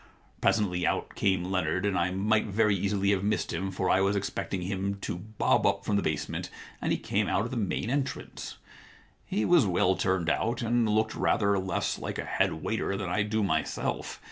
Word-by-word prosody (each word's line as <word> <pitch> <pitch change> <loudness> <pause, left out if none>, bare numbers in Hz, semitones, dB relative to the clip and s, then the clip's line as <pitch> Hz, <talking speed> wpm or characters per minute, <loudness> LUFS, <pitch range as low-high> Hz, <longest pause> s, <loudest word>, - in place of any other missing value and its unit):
Presently 90 -5 +2
out - - -1
came 95 -3 +1
Leonard, 95 +1 0
and 100 -2 +1
I 85 0 +2
might 105 +4 +1
very 105 0 +2
easily 100 +1 +1
have 95 -1 +1
missed 105 +1 0
him, 95 +3 -2
for 95 0 -2
I 95 +1 +4
was 100 +1 +2
expecting 95 -1 -2
him 95 +1 -2
to - - -3
bob 105 +5 0
up - - 0
from 105 - +1
the 100 - +2
base 75 -4 -1
ment, - - -4 0.3
and - - 0
he - - +2
came - - 0
out 100 - +1
of 120 - -5
the - - -3
main 105 +1 -1
entrance. 140 -1 -3 0.7
He 105 - 0
was 175 -11 +5
well 95 +1 +3
turned 95 -2 0
out, 115 +8 0
and 115 -1 +2
looked 110 +1 +1
rather 100 -2 +2
less 95 -2 -1
like - - -4
a - - -3
head - - 0
waiter 100 - -1
than 100 -3 -3
I 105 - +1
do 105 +1 0
myself. 80 -5 -2
100 Hz, 205 wpm, -28 LUFS, 95-105 Hz, 0.7 s, was